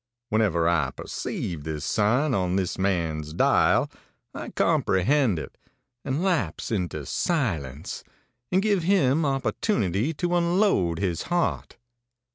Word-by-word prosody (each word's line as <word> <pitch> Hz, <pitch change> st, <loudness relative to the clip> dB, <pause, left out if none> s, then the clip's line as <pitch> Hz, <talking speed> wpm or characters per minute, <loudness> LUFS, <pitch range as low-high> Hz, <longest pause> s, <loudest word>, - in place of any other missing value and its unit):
Whenever 100 Hz, -8 st, +2 dB
I 85 Hz, -2 st, +2 dB
perceive 80 Hz, -5 st, -5 dB
this 75 Hz, -1 st, -4 dB
sign 125 Hz, +8 st, +2 dB
on 90 Hz, -4 st, 0 dB
this 95 Hz, -1 st, -1 dB
man's 80 Hz, -5 st, -1 dB
dial, -, -, +3 dB, 0.5 s
I -, -, -6 dB
comprehend 110 Hz, -, +2 dB
it, 80 Hz, -, -8 dB, 0.4 s
and 140 Hz, +6 st, -2 dB
lapse 150 Hz, -, -1 dB
into 90 Hz, -8 st, -2 dB
silence, 85 Hz, -, -2 dB, 0.5 s
and 190 Hz, +2 st, +2 dB
give 205 Hz, -4 st, +2 dB
him 160 Hz, -5 st, +2 dB
opportunity 135 Hz, -, 0 dB
to 175 Hz, +2 st, -1 dB
unload 170 Hz, -, +2 dB
his 90 Hz, -4 st, -1 dB
heart. 175 Hz, -7 st, -1 dB
105 Hz, 115 wpm, -25 LUFS, -, 0.5 s, dial